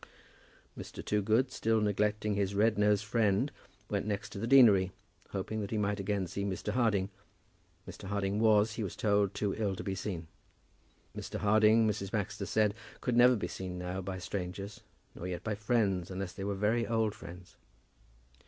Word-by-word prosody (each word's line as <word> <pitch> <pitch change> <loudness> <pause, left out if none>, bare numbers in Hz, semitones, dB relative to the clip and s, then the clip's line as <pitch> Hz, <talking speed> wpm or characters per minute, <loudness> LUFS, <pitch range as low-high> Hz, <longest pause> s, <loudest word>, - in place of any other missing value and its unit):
Mr. - - -8
Toogood, 110 +5 +2
still 115 0 +1
neglecting 105 0 0
his 100 -1 -1
red 110 +2 +3
nosed 105 0 +3
friend, 110 +3 +1 0.4
went 100 0 -2
next 105 0 -2
to 100 - -6
the 115 - -2
deanery, 110 -8 +6 0.4
hoping 105 +3 -3
that 100 - -4
he 110 - -2
might 105 0 0
again 100 -1 -1
see 95 +3 -4
Mr. 100 -2 -3
Harding. 105 -6 +1 0.8
Mr. - - -9
Harding 100 +1 -1
was, 110 -1 +4
he 110 - -3
was 95 - -5
told, 100 -2 +1
too 105 -2 -1
ill 100 -3 -1
to 105 - -6
be 95 - -2
seen. 95 -4 -4 0.9
Mr. - - -5
Harding, 110 +1 +4
Mrs. 100 -2 -2
Baxter 100 -1 -3
said, 105 -2 +2 0.3
could 125 - -1
never 125 +1 +7
be 105 - -3
seen 90 -1 -6
now 90 +1 -4
by 95 0 -5
strangers, 95 +2 -5 0.3
nor 90 - -6
yet 90 -1 -4
by 110 - -1
friends, 105 -4 0
unless 95 -1 -4
they 95 - -6
were 100 0 -1
very 110 +4 +1
old 110 -2 +1
friends. 90 -1 -11
105 Hz, 175 wpm, -32 LUFS, 95-110 Hz, 0.9 s, never